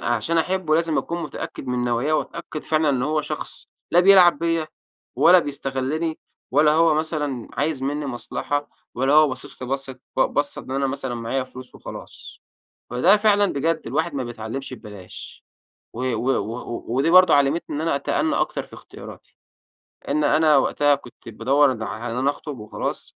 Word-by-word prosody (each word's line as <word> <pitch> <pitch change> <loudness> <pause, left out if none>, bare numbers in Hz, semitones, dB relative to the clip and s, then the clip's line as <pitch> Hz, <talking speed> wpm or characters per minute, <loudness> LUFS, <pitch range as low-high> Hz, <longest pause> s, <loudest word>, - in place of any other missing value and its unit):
عشان 140 +8 0
أحبه 175 -2 0
لازم 165 -1 +1
أكون 170 0 -3
متأكّد - - -7
من 125 -1 -1
نواياه 120 +5 0
وأتأكد 155 0 -4
فعلًا 155 -1 +1
إن 130 -3 +1
هو 155 +3 +1
شخص - - -7 0.2
لا 175 - +5
بيلعب 185 -2 +7
بيّا 165 -1 0 0.5
ولا 185 +1 +7
بيستغلني، 145 +2 -2 0.3
ولا 150 0 +4
هو 165 0 +4
مثلًا 150 -5 -2
عايز 145 -2 -2
مِنّي 145 +2 -2
مصلحة، 145 +3 -3 0.3
ولا 135 +3 +1
هو 155 0 +6
باصص 130 -1 -8
لي 125 - -5
بصّة 135 -1 -4 0.2
ب - - +1
بصّة 145 +2 0
إن - - -12
أنا 135 +1 0
مثلًا 130 -2 -4
معايا 120 +3 -2
فلوس 130 0 -12
وخلاص. - - -10 0.5
فده 150 - +4
فعلًا 205 -1 +3
بجد 160 +3 0
الواحد 160 +1 -1
ما 130 -2 -2
بيتعلمش 120 +3 -6
ببلاش. 105 -6 -11 0.5
و 120 - -5
و 120 +4 -1
و 115 0 -3
ودي 135 +7 +1
برضو 185 +1 +7
علمتني 145 +2 +2
إن - - -2
أنا 165 -3 +1
أتأنى 310 - 0
أكتر - - -1
في - - -15
اختياراتي. - - -13 0.7
لأن 150 - +1
أنا 155 0 +4
وقتها 145 +1 +3
كنت 120 -3 -13
بادوّر 130 +5 +2
ن 110 - -6
على 115 +2 -5
إن - - -4
أنا 135 +2 +2
أخطب 145 -3 -8
وخلاص 105 0 -5
140 Hz, 170 wpm, -23 LUFS, 130-160 Hz, 0.7 s, بيلعب